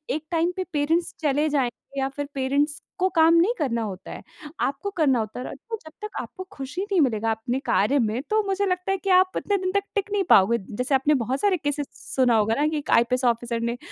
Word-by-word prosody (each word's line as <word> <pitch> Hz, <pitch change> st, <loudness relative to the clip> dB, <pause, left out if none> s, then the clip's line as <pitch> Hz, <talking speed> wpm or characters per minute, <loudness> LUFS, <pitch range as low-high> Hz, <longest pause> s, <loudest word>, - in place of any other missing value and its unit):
एक 310 Hz, 0 st, -5 dB
टाइम 335 Hz, +1 st, +1 dB
पे 370 Hz, -, 0 dB
पेरेंट्स 320 Hz, +4 st, +1 dB
चले 295 Hz, 0 st, +2 dB
जाएँगे 275 Hz, 0 st, -2 dB
या 270 Hz, 0 st, 0 dB
फिर 285 Hz, +1 st, -5 dB
पेरेंट्स 285 Hz, +3 st, 0 dB, 0.2 s
को 375 Hz, +1 st, +3 dB
काम 325 Hz, 0 st, +6 dB
नहीं 365 Hz, +8 st, +4 dB
करना 235 Hz, -6 st, 0 dB
होता 190 Hz, -3 st, -7 dB
है। -, -, -8 dB, 0.4 s
आपको 280 Hz, +9 st, -2 dB
करना 270 Hz, -6 st, +3 dB
होता 220 Hz, +2 st, -4 dB
है 255 Hz, -, -5 dB
र -, -, -9 dB, 0.3 s
जब 315 Hz, -, -10 dB
तक 425 Hz, -, -3 dB
आपको 370 Hz, -, -8 dB
खुशी 280 Hz, +7 st, -5 dB
नहीं 400 Hz, -4 st, +1 dB
मिलेगा 225 Hz, -4 st, +1 dB
अपने 240 Hz, +4 st, -2 dB
कार्य 270 Hz, +8 st, +2 dB
में, 225 Hz, +1 st, 0 dB
तो 435 Hz, 0 st, +2 dB
मुझे 390 Hz, +1 st, 0 dB
लगता 365 Hz, 0 st, -1 dB
है 390 Hz, -, +1 dB
कि 390 Hz, +1 st, -5 dB
आप 370 Hz, 0 st, +4 dB
इतने 405 Hz, -, 0 dB
दिन 370 Hz, -1 st, -2 dB
तक 400 Hz, -, +2 dB
टिक 405 Hz, 0 st, -1 dB
नहीं 410 Hz, -1 st, +1 dB
पाओगे। 205 Hz, +5 st, +6 dB, 0.2 s
जैसे 250 Hz, +4 st, +1 dB
आपने 280 Hz, +3 st, +3 dB
बहुत 265 Hz, +2 st, -2 dB
सारे 400 Hz, -3 st, +3 dB
केसेज़ 290 Hz, -2 st, -2 dB
सुना 250 Hz, -3 st, +1 dB
होगा 220 Hz, +1 st, +2 dB
ना, 300 Hz, -, +3 dB
कि 310 Hz, 0 st, -1 dB
एक 295 Hz, -, -4 dB
आईपीएस 250 Hz, +2 st, +3 dB
ऑफ़िसर 235 Hz, 0 st, 0 dB
ने 235 Hz, +1 st, -2 dB
285 Hz, 235 wpm, -24 LUFS, 245-360 Hz, 0.4 s, काम